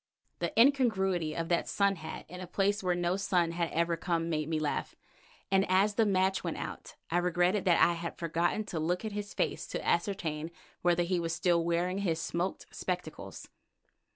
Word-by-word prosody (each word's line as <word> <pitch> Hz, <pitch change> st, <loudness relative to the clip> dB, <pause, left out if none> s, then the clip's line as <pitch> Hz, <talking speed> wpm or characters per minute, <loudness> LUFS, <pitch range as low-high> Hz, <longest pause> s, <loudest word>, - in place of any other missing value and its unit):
The -, -, -1 dB
incongruity 195 Hz, -, +3 dB
of 165 Hz, 0 st, -2 dB
that 170 Hz, -1 st, +1 dB
sun 200 Hz, -1 st, +2 dB
hat 160 Hz, -1 st, -7 dB
in 180 Hz, +1 st, -8 dB
a 185 Hz, -, -6 dB
place 200 Hz, +2 st, +1 dB
where 180 Hz, -2 st, +1 dB
no 175 Hz, +1 st, 0 dB
sun 180 Hz, -4 st, +1 dB
had 170 Hz, -1 st, -1 dB
ever 170 Hz, +1 st, +1 dB
come 165 Hz, 0 st, -1 dB
made 155 Hz, -1 st, -1 dB
me 160 Hz, -1 st, 0 dB
laugh, 150 Hz, -1 st, -2 dB, 0.6 s
and 195 Hz, 0 st, +5 dB
as 195 Hz, +3 st, +4 dB
the 220 Hz, 0 st, +3 dB
match 190 Hz, -1 st, +2 dB
went -, -, -3 dB
out -, -, -7 dB, 0.2 s
I 175 Hz, -, +3 dB
regretted 180 Hz, +3 st, +1 dB
that 175 Hz, -3 st, +4 dB
I 175 Hz, -, +5 dB
had 170 Hz, 0 st, -5 dB
forgotten 170 Hz, +5 st, 0 dB
to 180 Hz, -6 st, -4 dB
look 175 Hz, +6 st, -1 dB
at 215 Hz, -, -3 dB
his 205 Hz, 0 st, -5 dB
face -, -, -1 dB
to -, -, -4 dB
ascertain 165 Hz, -4 st, 0 dB, 0.3 s
whether 175 Hz, 0 st, +3 dB
he 180 Hz, +1 st, 0 dB
was 165 Hz, -1 st, -2 dB
still 170 Hz, -3 st, +2 dB
wearing 175 Hz, +3 st, 0 dB
his 170 Hz, -5 st, 0 dB
smoked 170 Hz, +2 st, -2 dB
spectacles. -, -, -5 dB
175 Hz, 190 wpm, -31 LUFS, 170-195 Hz, 0.6 s, and